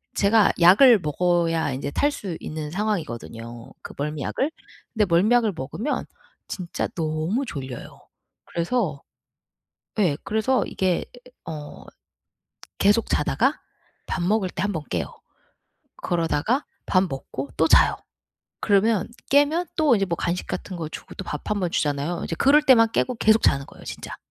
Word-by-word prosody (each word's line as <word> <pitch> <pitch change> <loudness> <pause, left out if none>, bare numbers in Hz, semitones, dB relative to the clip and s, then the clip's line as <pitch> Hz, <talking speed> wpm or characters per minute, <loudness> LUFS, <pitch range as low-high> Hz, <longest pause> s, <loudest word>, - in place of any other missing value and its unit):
제가 205 +1 +4
약을 205 +7 +7
먹어야 165 -1 +1
인제 135 +2 -4
탈 290 - +1
수 190 - -5
있는 155 -1 -6
상황이거든요, 120 - -4
그 - - -9
멀미약을. 150 - -2 0.4
근데 215 -2 +2
멀미약을 210 +5 +3
먹으면 175 - -3 0.4
진짜 180 -2 -4
너무 160 - -1
졸려요. 130 - -8 0.4
그래서 170 - -1 1.0
예 175 -8 +2
그래서 220 +5 +1
이게 185 -2 0 0.4
어 150 -2 -8 0.9
계속 205 +3 +3
자다가 - - +1 0.5
밥 180 - -2
먹을 190 +1 +1
때 175 - -4
한 205 - 0
번 160 -5 -3
깨요. 85 -2 -1 0.9
그러다가 175 - 0 0.2
밥 185 - +3
먹고 135 -1 -6
또 160 - +3
자요. - - +5 0.6
그러면 205 -1 +2 0.2
깨면 290 +5 +3
또 305 -5 +4
인제 195 -3 +1
뭐 170 - -2
간식 175 +2 -2
같은 185 - -5
거 160 -2 -4
주고 150 - -10
또 - - -7
밥 150 - -6
한 210 -1 0
번 175 -2 -1
주잖아요. 145 +3 -1
이제 165 - -3
그럴 290 +3 +5
때만 230 -5 +5
깨고 250 - 0
계속 220 0 +4
자는 140 0 +2
거예요, - - -15
진짜. - - -7
180 Hz, 280 characters per minute, -24 LUFS, 155-220 Hz, 1.0 s, 약을